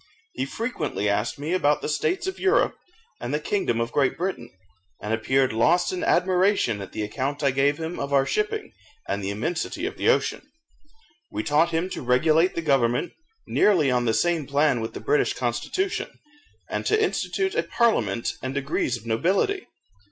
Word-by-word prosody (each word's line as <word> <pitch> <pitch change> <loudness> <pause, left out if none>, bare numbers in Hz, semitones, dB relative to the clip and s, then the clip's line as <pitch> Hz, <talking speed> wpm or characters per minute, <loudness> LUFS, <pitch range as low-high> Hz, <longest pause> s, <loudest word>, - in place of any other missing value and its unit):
He 130 - -2
frequently 160 - -3
asked 105 +3 0
me 150 +5 -3
about 150 -5 +2
the - - -1
states 155 - 0
of 380 - -4
Europe, - - +2 0.4
and 120 - -4
the 150 - 0
kingdom 150 - -1
of 115 0 -1
Great 135 -1 +1
Britain, 175 -9 -3 0.5
and 105 - -3
appeared 130 +3 +1
lost 175 +12 +3
in 180 - -3
admiration 185 - +2
at 95 - -8
the 110 - -3
account 135 +8 -3
I 140 - +4
gave 140 +2 +2
him 165 +2 -4
of 140 0 -3
our 135 -1 +4
shipping, 425 - -2 0.4
and 100 0 -2
the 95 - -2
immensity 165 - -3
of 405 +1 -4
the - - +2
ocean. - - +1 0.9
We - - -3
taught 155 +3 +3
him 165 +2 -1
to - - -4
regulate 155 +8 +3
the 170 - -2
government 135 0 +1 0.3
nearly 165 -10 +3
on 125 -1 +1
the 110 -1 +2
same 165 +3 +1
plan 140 -3 +2
with 115 - -5
the - - -6
British 420 0 +2
constitution, 385 0 -2 0.6
and - - -3
to 430 - +3
institute 390 -2 0
a - - +2
parliament 115 - +1
and 130 +1 -4
degrees 140 -3 -1
of 115 - -15
nobility. 190 - 0
145 Hz, 180 wpm, -25 LUFS, 120-185 Hz, 0.9 s, I